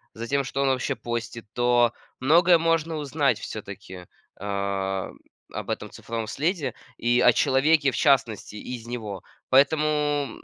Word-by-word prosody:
за 115 - -5
тем, 140 +3 0
что 135 +1 -3
он 135 - +2
вообще 130 -1 0
постит, 115 -1 -5
то 120 -1 +3 0.3
многое 170 +6 +5
можно 165 0 +1
узнать 140 -5 0
всё-таки 95 -3 -8 0.3
о 100 -1 -2 0.4
об - - -5
этом - - -3
цифровом 115 -1 -5
следе 145 - -1 0.2
и 120 +1 +2
о 125 - +7
человеке 140 +3 +3
в - - -6
частности 120 -8 +1
из 120 +1 -7
него. 110 -6 -6 0.2
Поэтому, 145 +3 +4 0.4
м, - - -12
125 Hz, 145 wpm, -25 LUFS, 110-145 Hz, 0.4 s, о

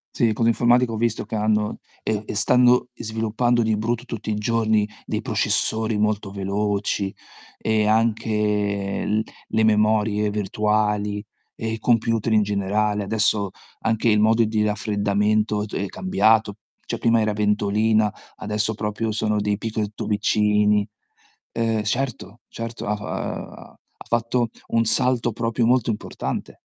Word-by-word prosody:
Sì, 120 - +2
le 110 - +2
cose 115 +2 +2
informatiche 120 +1 +3
ho 110 - -3
visto 115 +1 0
che - - -5
hanno 105 0 0 0.2
e 110 -1 -2
e - - -5
stanno 125 +4 +4
sviluppando 115 +2 0
di 110 -1 +1
brutto 120 +3 -2
tutti 110 -3 -5
i - - 0
giorni 110 -1 +1 0.2
dei - - -2
processori 110 0 0
molto 105 -2 0
veloci 100 0 -1 0.5
e 110 -1 +1
anche 105 -3 0
l 110 +1 +1 0.3
le 110 0 +1
memorie 105 -1 +2
virtuali 105 0 0 0.3
e 110 0 -3
computer 115 -1 +1
in 110 - +5
generale. 105 +1 0
Adesso, 105 -1 +1 0.3
anche 110 +1 +1
il 105 - +4
modo 110 +2 +4
di 110 0 0
raffreddamento 105 0 0
d 105 - -13
è 100 - -1
cambiato, 100 +3 +2 0.3
cioè - - -3
prima 115 -1 +3
era 105 -1 +1
ventolina, 105 +1 +2 0.3
adesso 105 +1 -1
proprio 105 +1 -2
sono 105 -1 0
dei 105 0 0
picco 110 -1 -2
tubicini. 105 0 +2 0.6
Ehm 115 -2 0
certo, 120 -1 -3
certo 115 0 -6
ha 105 - +1
f - - -9
ha - - -6 0.3
ha - - -35
fatto 120 0 0 0.2
un 115 0 +2
salto 120 +1 +1
proprio 115 0 0
molto 125 -2 +3
importante. 105 - -4
110 Hz, 140 wpm, -23 LUFS, 105-115 Hz, 0.6 s, in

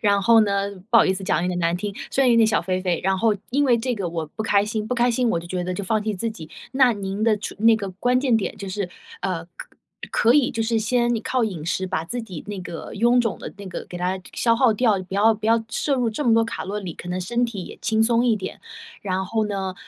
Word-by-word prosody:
然 200 -2 +3
后 230 +3 +6
呢 200 -1 +1 0.2
不 235 - +6
好 - - +7
意 - - +2
思 190 +1 -5
讲 180 - +1
有 180 - 0
点 180 -1 -2
难 170 0 +1
听， 200 +2 -4 0.2
虽 275 - +2
然 255 - +4
有 235 - +5
点 225 -1 +6
小 220 - +1
肥 185 +1 -1
肥， 180 -2 -1
然 190 0 +1
后 225 +1 +3 0.2
因 285 +3 +2
为 250 -4 +4
这 245 +2 -1
个 195 -5 -3
我 165 -1 -4
不 185 +8 -6
开 205 -2 +3
心， 215 0 -3
不 250 - -1
开 240 0 +3
心 245 +1 +1
我 170 - +1
就 170 - -10
觉 180 +1 -3
得 180 +1 -3
就 200 - -4
放 215 +2 0
弃 215 0 -2
自 225 +4 -2
己。 165 -8 -10 0.2
那 260 -2 +5
您 200 0 -4
的 220 -1 +3
出 210 - -6
那 225 +1 +5
个 200 -3 -4
关 245 +7 +1
键 255 -3 +2
点 215 - -3
就 195 - -7
是， 190 0 -3 0.3
呃， 180 -3 -2
可 170 0 -12 0.4
可 235 +1 +3
以 285 -3 +4
就 225 - -2
是 225 0 +1
先 240 +2 +1
你 225 - -1
靠 255 -1 0
饮 180 -8 -4
食 185 +3 -1
把 160 -3 -2
自 240 +8 -4
己 185 -8 -8
那 205 -2 -5
个 175 -3 -7
臃 235 +4 +3
肿 230 -4 0
的 - - -7
那 200 0 -9
个 180 - -6
给 175 - -8
它 180 +2 -2
消 230 -1 +3
倒 240 +1 +4
掉， 215 -3 +2
不 185 +1 -8
要 215 +3 +5
不 215 0 -5
要 225 0 +3
摄 285 - 0
入 245 -3 0
这 220 +7 -3
么 235 -5 +4
多 225 0 +4
卡 225 - -5
路 200 +2 -4
里， 190 -5 -4
可 175 - -10
能 180 +1 -2
身 235 +7 -1
体 205 -6 -6
也 - - -11
轻 220 0 +2
松 235 +1 +3
一 235 -3 +3
点。 195 - -7 0.4
然 190 -1 -2
后 220 +3 -1
呢， 195 -2 -3
210 Hz, 310 characters per minute, -23 LUFS, 185-230 Hz, 0.4 s, 好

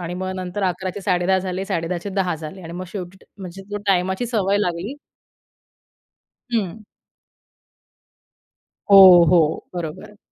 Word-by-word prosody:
आणि 175 0 -5
मग 185 +1 -4
नंतर 185 +2 -5
11:00चे 185 +1 -3
10:30 185 0 +1
झाले, 185 0 -4
10:30चे 175 +2 -3
10:00 185 -4 0
झाले 160 +4 -9
आणि 165 0 -9
मग 180 +2 -6
शेवटी 190 -1 -8
म्हणजे 190 0 -9
तो 205 - -3
टाईमाची 190 +3 +1
सवय 205 -4 0
लागली. 180 +4 -2 1.6
हं. 215 -2 -2 2.1
हो, 185 -3 +9
हो, 165 -4 +2
बरोबर. 175 +4 -7
185 Hz, 120 wpm, -21 LUFS, 175-195 Hz, 2.1 s, हो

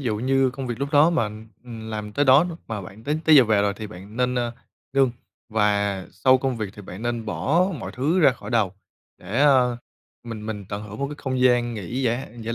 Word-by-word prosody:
dụ 115 -6 -1
như 130 +3 +2
công 135 0 -6
việc 120 -2 -4
lúc 140 +1 -2
đó 150 +3 +6
mà, 165 -9 +1 0.4
ừm, 115 -2 -8
làm 105 -1 -5
tới 145 +6 +1
đó 135 +4 +6
n 180 - -4 0.2
mà 110 -2 -4
bạn 95 +5 -12
tới 150 +3 0
tới 155 -2 +7
giờ 130 - +8
về 105 -2 +2
rồi 100 -1 0
thì 110 0 -6
bạn 100 +3 -11
nên, 125 0 +1
ơ, 120 -1 -1 0.4
ngưng, 135 -2 +3 0.4
và 100 -3 +1
sau 130 0 +3
công 130 -1 -1
việc 105 -3 -4
thì 105 - -10
bạn 95 +2 -9
nên 120 -1 -2
bỏ 160 - +1
mọi - - -6
thứ 155 +8 +1
ra 150 - +7
khỏi 125 - -10
đầu 110 -6 +1 0.5
để, 100 +9 -3
a, 130 -4 +4 0.5
mình 110 -2 -7
mình 105 -2 -5
tận 105 0 -4
hưởng 105 0 -9
một 140 - -1
cái 150 - -6
không 130 -1 -2
gian 120 -2 +3
nghỉ 115 +6 -4
giả 125 +2 0
giải 115 +1 -3
120 Hz, 240 wpm, -24 LUFS, 105-135 Hz, 0.5 s, giờ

